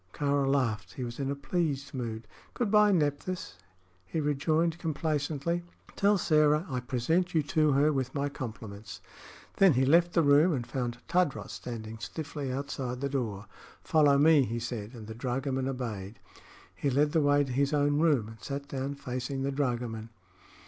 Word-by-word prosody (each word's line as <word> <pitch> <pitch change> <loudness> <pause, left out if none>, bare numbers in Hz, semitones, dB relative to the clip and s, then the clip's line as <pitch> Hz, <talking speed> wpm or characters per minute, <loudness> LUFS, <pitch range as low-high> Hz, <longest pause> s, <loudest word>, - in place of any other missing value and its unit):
Kāra 140 -1 +1
laughed. 110 -7 0
He 130 - -5
was 120 +1 -6
in 135 -1 -1
a 140 - -1
pleased 140 -2 -2
mood. 115 -4 -5 0.3
"Good 230 -5 -1
by, 210 -1 +6
Nephthys," 145 - -1 0.4
he 95 - -3
rejoined, 155 +3 +1
complacently. 155 0 -1 0.3
"Tell 200 +1 +3
Sĕra 155 -2 +3
I 125 - -1
present 140 +9 0
you 155 - +3
to 150 0 +2
her 145 +3 +3
with 130 -2 -2
my 140 0 0
compliments." 110 -7 -7 0.6
Then 195 -4 +6
he 130 +1 +2
left 170 +5 +4
the 165 - +4
room 145 +4 +5
and 125 -4 -2
found 120 -2 -3
Tadros 180 -6 0
standing 115 -2 -7
stiffly 145 0 -5
outside 130 -2 -4
the 140 +1 -2
door. 110 -7 -3 0.4
"Follow 145 -3 +4
me," 155 +1 +6
he 120 -2 -1
said, 115 -1 -5
and 110 -2 -9
the 110 - -7
dragoman 130 +2 -2
obeyed. 115 -6 -4 0.6
He 140 - -1
led 145 +3 +2
the 160 - +3
way 145 0 +4
to 135 - -5
his 140 +3 +1
own 145 0 +2
room 150 -9 +3
and 110 0 -12
sat 140 0 -5
down 140 +1 -3
facing 135 0 -4
the 140 - 0
dragoman. 120 -5 -2
140 Hz, 170 wpm, -29 LUFS, 125-150 Hz, 0.6 s, by